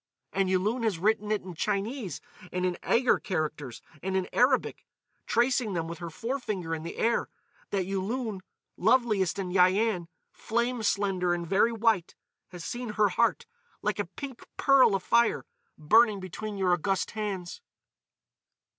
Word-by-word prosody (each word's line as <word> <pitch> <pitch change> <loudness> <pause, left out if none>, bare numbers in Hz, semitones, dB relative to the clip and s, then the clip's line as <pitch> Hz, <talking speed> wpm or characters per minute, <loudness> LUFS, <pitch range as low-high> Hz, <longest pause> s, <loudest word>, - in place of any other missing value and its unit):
And 195 -1 +1
Yulun 205 +6 +1
has 220 -6 0
written 210 +3 +1
it 215 - 0
in 185 -1 -8
Chinese, 200 - -2 0.3
in 180 0 -2 0.2
Eighur 245 +1 +2
characters 155 - -3 0.2
and 190 +1 -1
in 185 - -1
Arabic,—tracing 240 -3 0
them 165 -2 -2
with 170 0 -7
her 170 -1 -5
forefinger 210 - -3
in 160 - -3
the 170 - -7
air—that 205 -4 -2
Yulun, 195 +2 -3 0.4
loveliest 215 -4 +2
in 190 -2 -3
Yian, 185 0 +3 0.2
flame 235 +2 -1
slender 195 -4 +1
and 170 0 -4
very 195 +6 +3
white, 225 -6 +1 0.3
has 175 -2 -9
seen 240 -3 -4
her 210 -1 +3
heart, 235 - +1 0.4
like - - -1
a - - 0
pink 275 -4 -8
pearl 270 -7 +5
afire, 235 +5 +2 0.3
burning 215 +6 +4
between 200 +3 -6
your 185 -2 +2
august 185 +2 0
hands." 205 - -4
200 Hz, 135 wpm, -28 LUFS, 180-230 Hz, 0.4 s, pearl